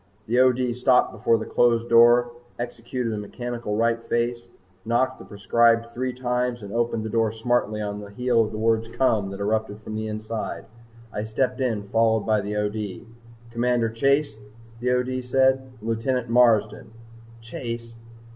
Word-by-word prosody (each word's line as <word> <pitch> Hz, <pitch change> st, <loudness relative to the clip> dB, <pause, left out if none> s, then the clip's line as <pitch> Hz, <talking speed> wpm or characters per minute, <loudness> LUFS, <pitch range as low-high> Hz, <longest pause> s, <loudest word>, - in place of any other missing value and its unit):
The 120 Hz, +3 st, +1 dB
O.D. 125 Hz, -1 st, +3 dB
stopped 125 Hz, +1 st, +3 dB
before 115 Hz, -, +2 dB
the 110 Hz, -, -5 dB
closed 120 Hz, -1 st, +2 dB
door, 120 Hz, +1 st, +5 dB, 0.3 s
executed 120 Hz, 0 st, -4 dB
a 105 Hz, -, -3 dB
mechanical 120 Hz, +1 st, -5 dB
right 115 Hz, +1 st, +1 dB
face, 120 Hz, 0 st, -1 dB, 0.4 s
knocked 130 Hz, +4 st, 0 dB
the -, -, -11 dB
prescribed 115 Hz, +3 st, +2 dB
three 130 Hz, +1 st, -2 dB
times 125 Hz, -1 st, -2 dB
and 100 Hz, -, -8 dB
opened 115 Hz, -1 st, 0 dB
the -, -, -3 dB
door 115 Hz, -1 st, +1 dB
smartly 110 Hz, -2 st, -1 dB
on 105 Hz, 0 st, -4 dB
the 105 Hz, -1 st, -9 dB
heels 115 Hz, +1 st, +1 dB
of 110 Hz, -, -10 dB
the -, -, -4 dB
word 115 Hz, +1 st, 0 dB
"Come" 115 Hz, -6 st, +1 dB
that 100 Hz, 0 st, -7 dB
erupted 105 Hz, 0 st, -1 dB
from 110 Hz, -, -7 dB
the 110 Hz, 0 st, -3 dB
inside. 110 Hz, +1 st, -5 dB, 0.5 s
I 105 Hz, -, -3 dB
stepped 120 Hz, +5 st, -1 dB
in 115 Hz, -5 st, -1 dB
followed 110 Hz, 0 st, +3 dB
by 110 Hz, 0 st, +1 dB
the 105 Hz, +1 st, -4 dB
O.D. 105 Hz, 0 st, -3 dB, 0.5 s
"Commander 120 Hz, -1 st, +1 dB
Chase," 135 Hz, 0 st, +1 dB, 0.4 s
the 125 Hz, +1 st, -1 dB
O.D. 125 Hz, +1 st, 0 dB
said. 130 Hz, +1 st, +2 dB
"Lieutenant 115 Hz, +2 st, -1 dB
Marsden." 115 Hz, -3 st, +3 dB, 0.5 s
Chase! 115 Hz, 0 st, -6 dB
115 Hz, 160 wpm, -24 LUFS, 110-125 Hz, 0.5 s, door